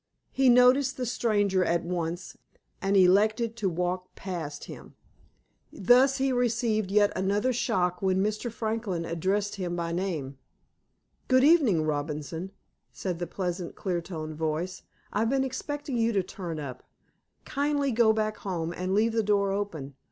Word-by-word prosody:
He 265 -1 +3
noticed 250 +2 +5
the 255 - -2
stranger 205 -6 +1
at 170 -1 +1
once, 175 0 -4 0.5
and 195 +1 +2
elected 215 +5 +4
to 205 -4 0
walk 180 +1 -3
past 165 -6 -5
him. - - -11 0.8
Thus, 255 +7 +4
he 270 0 +1
received 225 -4 +1
yet 205 +1 +3
another 205 +6 +1
shock 180 -6 0
when 190 0 +2
Mr. 215 +3 -2
Franklin 220 -6 -2
addressed 195 +5 -1
him 175 -2 -3
by 170 -1 -2
name. 160 -7 -3 0.9
"Good 255 0 +4
evening, 275 - +5
Robinson," 155 +3 -3 0.4
said 180 -3 -4
the 175 - -3
pleasant, 180 -1 -4
clear 180 -3 -2
toned 160 -3 -6
voice. 160 +3 -2 0.3
"I've 225 +2 +1
been 270 +1 +2
expecting 280 0 -4
you 230 0 +2
to 195 -2 +1
turn 175 -3 -6
up. 130 -4 -7 0.6
Kindly 285 -1 0
go 230 -1 +4
back 215 -1 -1
home, 170 -4 -3
and 185 +2 -2
leave 220 +2 +2
the 225 - +2
door 200 -2 +1
open. 170 -9 -4
195 Hz, 150 wpm, -28 LUFS, 175-230 Hz, 0.9 s, noticed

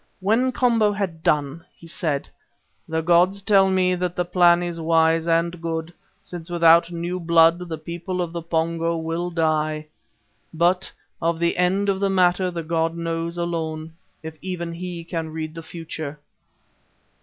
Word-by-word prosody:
When 225 +7 +2
Komba 230 -5 +2
had 180 -6 -3
done, 150 +1 0
he - - -16
said: 160 -5 -2 0.6
"The 160 0 -1
gods 175 +4 +3
tell 195 -2 +4
me 185 -1 +2
that 180 -1 -2
the 180 - 0
plan 175 -1 +4
is 170 -1 -4
wise 165 0 +3
and 170 +1 +1
good, 165 0 -3 0.3
since 175 -1 -8
without 170 0 +5
new 175 +2 -3
blood 165 0 +4
the 160 - -3
people 170 +3 -5
of 175 -2 -2
the 170 - -4
Pongo 165 0 -1
will 165 +2 -3
die, 155 -2 0 0.7
but 175 +3 +1 0.3
of 165 0 +1
the 170 +1 +1
end 190 +3 +1
of 195 -1 +1
the 200 0 +1
matter 185 -1 +2
the 170 -2 -5
god 165 +1 -1
knows 165 0 -3
alone, 160 -2 -3 0.3
if 160 -1 -8
even 175 -2 -4
he 175 0 -6
can 165 -1 -4
read 155 0 -5
the 165 - -7
future." 160 -3 -7
170 Hz, 160 wpm, -23 LUFS, 165-180 Hz, 0.7 s, without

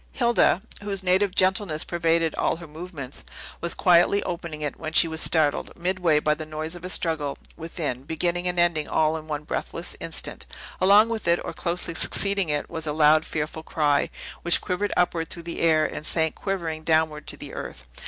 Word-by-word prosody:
Hilda 235 -6 +2 0.2
(whose 200 -2 -3
native 185 +1 +2
gentleness 185 -4 +2
pervaded 165 -1 +1
all - - 0
her 170 +1 -10
movements) 155 -4 -7 0.4
was 170 - +1
quietly 180 +3 +4
opening 170 -3 -5
it, 145 - -4
when 160 0 -5
she 170 - +6
was 160 0 -1
startled, 155 -3 +2
midway, 175 -3 +1
by 150 0 +2
the 155 +1 -6
noise 155 +1 -5
of 175 -1 -9
a 180 - -5
struggle 160 -6 0 0.2
within, 160 -6 -4
beginning 170 +4 -1
and 180 0 -1
ending 170 -3 +2
all 155 0 +1
in 155 -1 -7
one 150 -1 -4
breathless - - -3
instant. - - -1 0.3
Along 200 +4 +6
with 225 -5 -4
it, 170 0 +3
or - - -5
closely 170 -1 -1
succeeding 200 +1 +1
it, 145 -1 -1
was 160 -1 -4
a 150 - -1
loud, 155 +1 +4
fearful 155 +1 -4
cry, 150 -3 +1 0.3
which 175 - +4
quivered 200 +3 -2
upward 170 -2 +1
through 170 - -6
the 170 0 -5
air, 155 -2 +3
and - - -5
sank 160 0 +1
quivering 170 -5 -4
downward 155 -1 +1
to - - -3
the - - -9
earth. 60 0 -7
165 Hz, 190 wpm, -25 LUFS, 155-180 Hz, 0.4 s, she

